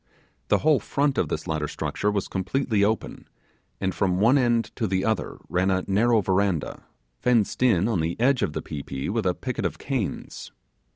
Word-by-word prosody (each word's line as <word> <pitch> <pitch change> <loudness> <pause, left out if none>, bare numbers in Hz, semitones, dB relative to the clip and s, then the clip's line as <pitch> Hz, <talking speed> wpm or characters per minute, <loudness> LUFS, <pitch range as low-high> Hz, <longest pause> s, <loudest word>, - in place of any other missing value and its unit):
The - - +4
whole 150 -3 +3
front 140 +6 0
of - - 0
this - - -3
latter 80 -1 -2
structure 105 - -2
was 100 -2 -1
completely 105 +3 0
open, 110 +2 -2 0.5
and 95 -1 -1
from 90 -1 0
one 115 +6 +5
end 120 -4 +2
to 110 - 0
the 95 -1 0
other 110 -3 -1
ran 95 +2 +1
a 95 -1 +1
narrow 110 +3 +3
verandah, 95 -4 0 0.3
fenced 120 -3 +1
in 105 -6 +4
on 110 -7 0
the 80 +4 -2
edge 130 +2 +3
of 75 - 0
the - - -4
pi 75 - -5
pi 70 0 -5
with 110 -1 0
a 90 - +1
picket 125 -2 -4
of - - -2
canes. 130 -7 -4
100 Hz, 190 wpm, -25 LUFS, 95-120 Hz, 0.5 s, one